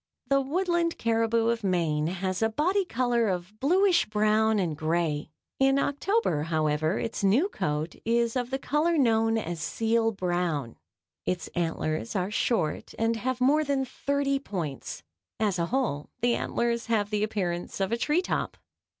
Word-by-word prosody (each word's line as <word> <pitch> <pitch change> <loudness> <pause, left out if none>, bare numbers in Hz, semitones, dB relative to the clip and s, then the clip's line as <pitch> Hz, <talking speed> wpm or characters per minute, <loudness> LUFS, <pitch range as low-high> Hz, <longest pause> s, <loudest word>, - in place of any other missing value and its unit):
The 275 0 +4
Woodland 340 +3 0
caribou 230 0 +1
of 235 -1 -1
Maine 165 -5 +1
has 185 +2 -2
a 225 - +3
body 365 - +1
color 240 -5 +1
of 185 +3 -4
bluish 365 +5 +3
brown 215 +1 +2
and 175 -6 0
gray. 155 -1 -1 0.3
In 270 0 +4
October, 285 - +1
however, 155 +2 0
its 225 - -3
new 225 - +4
coat 150 - -2
is 235 +1 +1
of 250 -1 -1
the 265 - -1
color 310 +5 +1
known 225 -4 +3
as 170 -6 -4
seal 225 +5 +1
brown. 175 - -2 0.5
Its 180 -1 -2
antlers 165 +3 -2
are 190 +1 -1
short 215 -8 -1
and 225 +1 +1
have 255 +2 -2
more 285 +5 +4
than 275 -2 0
thirty 275 +1 -1
points. 170 - -5 0.4
As 205 -5 +1
a 170 - 0
whole 230 - -1
the 240 0 +3
antlers 235 0 -1
have 215 -2 0
the 210 -1 0
appearance 180 -5 -2
of 195 +1 0
a 230 - +1
tree 305 +8 +1
top. - - -2
225 Hz, 160 wpm, -27 LUFS, 175-265 Hz, 0.5 s, The